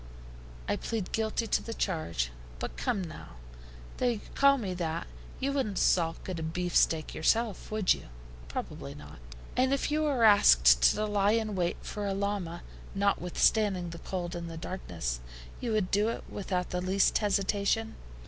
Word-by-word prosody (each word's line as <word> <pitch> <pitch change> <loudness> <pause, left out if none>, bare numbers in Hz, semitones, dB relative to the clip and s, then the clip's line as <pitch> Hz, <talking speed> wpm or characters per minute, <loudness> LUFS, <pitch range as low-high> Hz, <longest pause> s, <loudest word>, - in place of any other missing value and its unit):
"I - - 0
plead 220 -5 -3
guilty 220 +1 0
to - - +1
the 230 - -6
charge. 85 - -1 0.3
But - - -5
come, 185 - -1
now, 155 - -9 0.6
though 250 - +1
you 230 -4 0
call 275 0 +5
me 200 -7 -3
that, 170 -2 -3 0.3
you 275 +1 -1
wouldn't 235 -8 -1
sulk 165 -2 +1
at 185 -3 -3
a - - -4
beefsteak 165 -1 +1
yourself, 220 +4 +1
would 215 -3 +3
you?" - - -10 0.4
"Probably 70 +3 -6
not." - - -12 0.4
"And 260 +1 +3
if 275 +1 0
you 305 +1 +1
were 280 -6 +1
asked 60 - +7
to 215 - 0
lie 205 0 +2
in 220 -2 0
wait 175 -2 0
for 205 -1 -4
a 195 - -1
llama, 195 -4 -2 0.3
notwithstanding 195 -1 +2
the 170 - -8
cold 175 -2 -4
and 170 -1 -5
the 165 - -7
darkness, 85 - -4 0.4
you 240 - -2
would 210 -4 0
do 205 +2 +3
it 230 - -4
without 185 -3 -2
the 180 - -1
least 190 +2 +2
hesitation?" 205 +2 +1
195 Hz, 165 wpm, -30 LUFS, 170-215 Hz, 0.6 s, asked